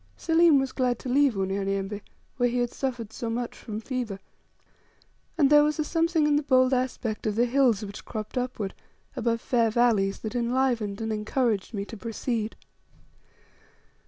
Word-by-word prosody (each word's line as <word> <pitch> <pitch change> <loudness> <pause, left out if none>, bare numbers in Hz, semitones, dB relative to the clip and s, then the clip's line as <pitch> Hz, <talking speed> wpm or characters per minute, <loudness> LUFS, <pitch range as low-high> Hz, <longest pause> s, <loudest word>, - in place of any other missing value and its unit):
Selim 330 -2 +4
was 270 -1 -1
glad 250 -2 0
to - - -9
leave 275 -2 +3
Unyanyembe, 195 +1 -2 0.4
where 245 -1 +2
he 245 - -2
had 245 -1 0
suffered 240 -5 -4
so 230 - -4
much 235 +1 -3
from 215 -1 -6
fever; 235 -4 -4 1.2
and 290 -3 +4
there 295 0 +8
was 300 +1 +1
a 310 - +1
something 330 0 +1
in 295 -1 +3
the - - +1
bold 255 -2 +3
aspect 250 -4 -2
of 210 - -1
the 235 +2 +3
hills 240 -4 +2
which 200 0 -9
cropped 215 +1 -6
upward 245 -6 -2 0.4
above 230 -2 0
fair 230 -3 +2
valleys, 215 -4 +2
that 220 - -4
enlivened 240 -4 0
and 220 0 -2
encouraged 215 0 -1
me 200 0 -3
to 225 - -9
proceed. 225 0 -3
240 Hz, 165 wpm, -27 LUFS, 215-260 Hz, 1.2 s, there